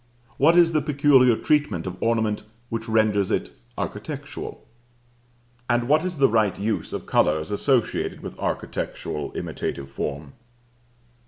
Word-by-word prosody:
What 165 +5 +5
is 170 -1 +6
the 155 -2 +2
peculiar 135 -4 +4
treatment 145 - +1
of 90 -1 -4
ornament 110 -2 +1 0.3
which 115 0 -4
renders 110 -3 +2
it - - -1 0.3
architectural? - - -6 1.0
and 120 0 +2
what 150 +4 +4
is 180 -2 -3
the 135 -1 +5
right 110 -4 +2
use 110 +2 -2
of - - -5
color 75 - +3
as 80 +3 -5
associated 120 +3 0
with - - -7
architectural 75 -2 -3
imitative 70 0 -4
form? 70 +1 -5
115 Hz, 135 wpm, -24 LUFS, 100-140 Hz, 1.0 s, is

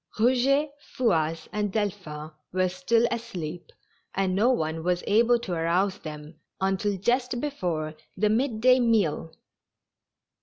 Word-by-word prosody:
Eouget, 260 +5 +3
Fouasse 165 - 0
and 210 -1 -1
Delphin 180 -8 -3 0.2
were 185 0 +1
still 220 +6 +2
asleep, 175 -8 -5 0.4
and 190 -1 +1
no 220 +6 +4
one 160 -9 0
was 180 0 0
able 235 +3 +4
to 210 -6 -5
arouse 180 +4 +1
them 150 0 -9 0.2
until 195 +1 0
just 245 +5 0
before 175 - -2 0.2
the 210 +3 +2
mid 230 -1 0
day 255 +1 +6
meal. 210 -10 +1
195 Hz, 125 wpm, -26 LUFS, 165-235 Hz, 0.4 s, day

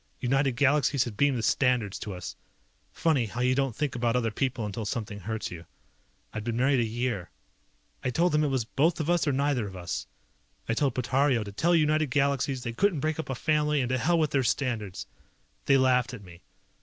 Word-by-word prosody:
United 135 +1 +1
Galaxies 140 +1 +3
had 120 -5 -6
beamed 140 +2 +2
the 115 - -3
standards 125 -7 +1
to 105 - -5
us. 90 -1 -7 0.6
Funny 145 -8 +1
how 120 +4 -7
you 125 +1 +3
don't 135 -3 0
think 145 -2 -1
about 120 0 0
other 115 -3 +1
people 130 -1 -2
until 105 +2 -4
something 105 -1 -4
hurts 110 +3 -4
you. 85 -2 -8 0.7
I'd 110 - -4
been 115 0 -2
married 135 +1 +3
a - - +3
year. 115 -4 -2 0.7
I 130 - 0
told 170 +8 +2
them 150 0 +2
it - - +2
was 130 -4 0
both 155 +8 +1
of 160 +2 0
us 175 -2 +2
or - - +3
neither 135 -4 0
of 95 - -9
us. 90 -2 -4 0.6
I 115 - +1
told 135 +1 0
Portario 130 -1 +2
to 100 - -7
tell 170 - +2
United 155 -2 +2
Galaxies 140 -1 0
they 120 -2 -4
couldn't 185 - +1
break 155 +2 -1
up 160 - -4
a 135 - -2
family 150 +2 +1
and 125 -2 -1
to 130 0 0
hell 170 +7 +2
with 155 -2 +1
their 135 - +2
standards. 115 -5 -2 0.6
They 140 - +6
laughed 130 -1 +2
at 105 - -12
me. 90 -2 -14
130 Hz, 215 wpm, -28 LUFS, 115-145 Hz, 0.7 s, They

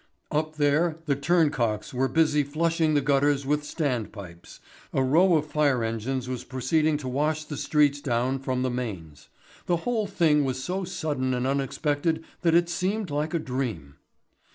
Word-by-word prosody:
Up 155 +1 -1
there 155 +3 +2
the 140 -3 +1
turncocks 140 -9 +1
were 130 +1 +1
busy 155 0 +3
flushing 160 +2 0
the 145 - +3
gutters 140 0 +2
with 150 +2 +1
standpipes, 110 - -4 0.3
a 135 - +2
row 170 +7 +4
of 155 -1 +1
fire 145 -5 +1
engines 115 +3 -2
was 125 -1 -4
proceeding 150 +4 +1
to 145 -3 -7
wash 150 +4 0
the 150 - -7
streets 145 -1 +2
down 130 +1 0
from 130 -1 -2
the 130 - 0
mains. 95 -12 -6 0.4
The 175 - +2
whole 230 -4 0
thing 160 -6 +3
was 130 -1 -2
so 185 +4 -2
sudden 145 -8 -2
and 125 0 -1
unexpected 145 +4 0 0.2
that 165 -2 +3
it 170 0 +4
seemed 185 +1 -2
like 150 +3 -1
a - - +3
dream. 120 - -4
145 Hz, 165 wpm, -26 LUFS, 130-160 Hz, 0.4 s, row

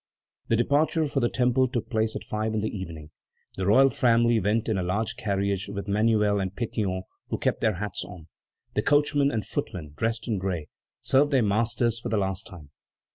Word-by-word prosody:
The 115 - +2
departure 150 +7 +2
for 140 -1 -1
the 120 -2 +2
Temple 125 +1 +2
took 120 -3 -3
place 110 -1 0
at - - -4
five 110 +1 -2
in 105 - 0
the 110 - -3
evening. 80 -5 -7 0.4
The 95 0 -2
royal 135 +7 +6
family 120 -2 +3
went 105 +3 0
in 110 - +1
a - - 0
large 105 +5 -1
carriage 100 -2 -1
with 100 0 -5
Manuel 105 0 +2
and 95 -1 -2
Pétion, 100 -5 -2 0.3
who - - -1
kept - - -1
their 110 -3 +2
hats 100 +1 -3
on. 90 -5 -11 0.5
The - - +1
coachman 145 -1 +3
and 110 -6 -2
footmen, 75 -5 -5
dressed 115 +5 -2
in 110 -5 0
gray, 90 -5 -3 0.3
served 140 +2 +3
their 135 -4 +3
masters 115 +2 +1
for - - -5
the 110 - +1
last 95 +1 -2
time. 85 -9 -12
110 Hz, 195 wpm, -26 LUFS, 95-120 Hz, 0.5 s, royal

